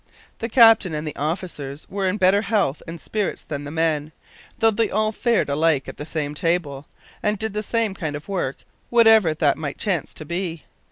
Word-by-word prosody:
The 230 - -3
captain 225 -8 +6
and 150 0 -4
officers 150 -3 -4
were 195 0 -2
in 185 +3 0
better 190 +1 +4
health 200 -10 0
and 165 0 -7
spirits 210 +5 -3
than 145 -1 -5
the - - -6
men, 155 -1 0 0.5
though 225 0 +4
they 220 +1 0
all 215 0 +1
fared 235 +1 +1
alike 145 -1 +1
at - - -8
the 150 - -7
same 150 -2 -3
table, 150 -3 -1 0.3
and 210 0 +1
did 220 0 -3
the 210 - -1
same 225 -1 -1
kind 160 -6 -4
of 145 - -8
work, 180 -9 -2 0.3
whatever 225 -8 +5
that 150 -2 +1
might 145 -3 -4
chance 190 -6 -2
to 155 - -7
be. 170 -1 -4
170 Hz, 190 wpm, -22 LUFS, 150-210 Hz, 0.5 s, captain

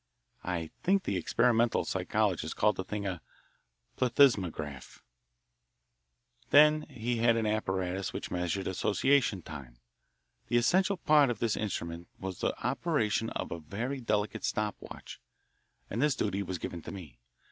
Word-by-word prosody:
I 85 -3 -3
think 195 +1 +2
the 100 - -1
experimental 115 +5 +2
psychologists 95 -3 -1
called 105 - +3
the 95 - -3
thing 100 +2 -4
a 90 -4 -3 0.8
"plethysmograph." 95 - +1 1.5
Then 150 +1 +6
he 120 +2 -2
had 115 0 +3
an 110 - 0
apparatus 95 -3 -1
which - - -6
measured 90 +2 -1
association 105 - +1
time. 65 -6 -9 0.7
The 120 - +2
essential 185 - +3
part 150 -4 +4
of 120 - -1
this 110 0 0
instrument 85 -5 -4
was 95 -1 -5
the - - -1
operation 120 -5 0
of - - -4
a 85 - -4
very 115 - -4
delicate 105 -3 -1
stop 105 -1 -1
watch, - - -10 0.7
and 115 - -3
this 150 -1 +3
duty 100 -1 -1
was 95 -2 -3
given 85 0 -6
to - - -8
me. 80 -11 -10
105 Hz, 140 wpm, -30 LUFS, 90-120 Hz, 1.5 s, Then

